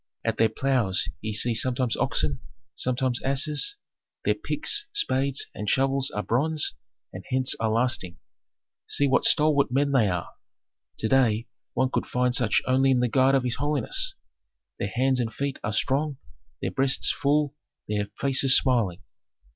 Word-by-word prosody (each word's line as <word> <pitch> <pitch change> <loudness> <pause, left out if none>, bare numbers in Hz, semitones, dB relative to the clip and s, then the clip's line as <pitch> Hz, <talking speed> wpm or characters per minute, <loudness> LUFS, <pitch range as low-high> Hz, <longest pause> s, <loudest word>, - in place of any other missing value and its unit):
At - - -1
their 115 0 +3
ploughs 120 -5 0
ye 110 - -3
see 115 +3 +2
sometimes 125 +1 +1
oxen, 70 -3 -1 0.3
sometimes 130 0 -1
asses; 150 - +2 0.5
their - - +3
picks, 420 0 -1
spades, 140 - 0
and 105 -1 -4
shovels 135 +2 +1
are 105 - -4
bronze, 150 - 0 0.4
and - - -8
hence 130 0 +2
are 110 - 0
lasting. 110 -6 0 0.7
See 145 - +2
what 135 - +2
stalwart 150 -4 +3
men 140 +2 +1
they 120 -7 +3
are! 90 -2 -3 0.7
To 110 - -1
day 115 -3 +2 0.3
one 130 +1 +1
could - - -1
find 125 0 0
such 120 -5 +2
only 130 +1 +2
in 130 -2 +3
the 125 - +2
guard 130 +3 +3
of 135 - +1
his 125 -1 -2
holiness. 145 -3 -1 0.6
Their 100 - -2
hands 130 +4 +1
and 115 -2 -1
feet 140 +4 -4
are 110 - -2
strong, 140 +6 0 0.5
their - - -1
breasts 135 0 +1
full, 145 0 0 0.3
their 105 -1 -2
faces 135 -1 +4
smiling. 105 -8 0
130 Hz, 155 wpm, -25 LUFS, 115-135 Hz, 0.7 s, faces